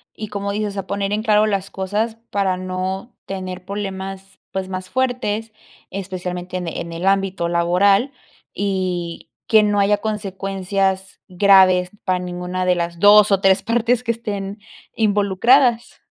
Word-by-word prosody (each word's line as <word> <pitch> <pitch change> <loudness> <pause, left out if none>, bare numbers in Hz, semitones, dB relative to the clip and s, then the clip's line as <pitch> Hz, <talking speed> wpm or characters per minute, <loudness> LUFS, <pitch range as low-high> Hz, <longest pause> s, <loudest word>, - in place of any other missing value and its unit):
y, 215 -1 -6
como 200 0 -3
dices, 205 0 -3
a 195 -1 -4
poner 200 0 -2
en 210 +1 0
claro 215 -1 +3
las 200 -2 -1
cosas 210 +4 -2 0.2
para 195 -2 +1
no 185 +4 -4
tener 185 -1 -6
problemas, 195 -1 -6
pues, 190 -1 -4
más 185 -1 -5
fuertes, 245 -4 -1 0.4
especialmente 180 -1 -5
en 180 -1 -4
en 170 +1 -5
el 170 +2 -4
ámbito 195 -3 +1
laboral, 195 +8 +3 0.4
y 185 -4 -3 0.2
que 220 -1 +5
no 205 -1 +1
haya 205 +1 +3
consecuencias 195 -2 -2
graves 185 -1 +5
para 185 -1 +1
ninguna 180 +1 -4
de 180 0 +3
las 170 -1 -3
2, 205 +1 +7
o, 195 -1 +3
3 190 -1 +4
partes 235 +1 +1
que 230 - +1
estén 205 -3 -5 0.4
involucradas. 225 +4 +2
195 Hz, 145 wpm, -20 LUFS, 185-210 Hz, 0.4 s, 2